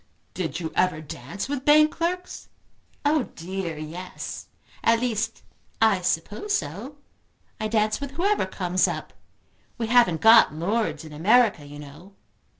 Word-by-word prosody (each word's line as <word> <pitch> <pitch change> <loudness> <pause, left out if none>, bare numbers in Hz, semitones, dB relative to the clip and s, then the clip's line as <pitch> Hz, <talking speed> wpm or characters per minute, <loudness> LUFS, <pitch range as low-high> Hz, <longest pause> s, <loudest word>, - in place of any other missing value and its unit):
"Do 180 -3 -2
you 160 -1 -4
ever 180 -4 +2
dance 155 - -7
with 275 -2 -3
bank 305 +1 +6
clerks?" 360 +2 -4 0.6
"Oh 295 -2 +2
dear 175 -1 -5
yes. 165 +4 -7 0.4
At 230 0 +4
least 230 -2 -2 0.4
I 220 -4 +3
suppose 180 - -1
so. 200 - -7 0.6
I 215 - -1
dance 215 +2 +1
with 280 - -4
whoever 390 - +1
comes 185 -1 0
up. - - -5 0.6
We 235 - -2
haven't 225 -8 +3
got 225 -7 +7
lords 200 +2 -1
in 155 - -11
America, 200 -1 +3
you 145 0 -10
know!" 150 +7 -13
205 Hz, 140 wpm, -25 LUFS, 165-245 Hz, 0.6 s, got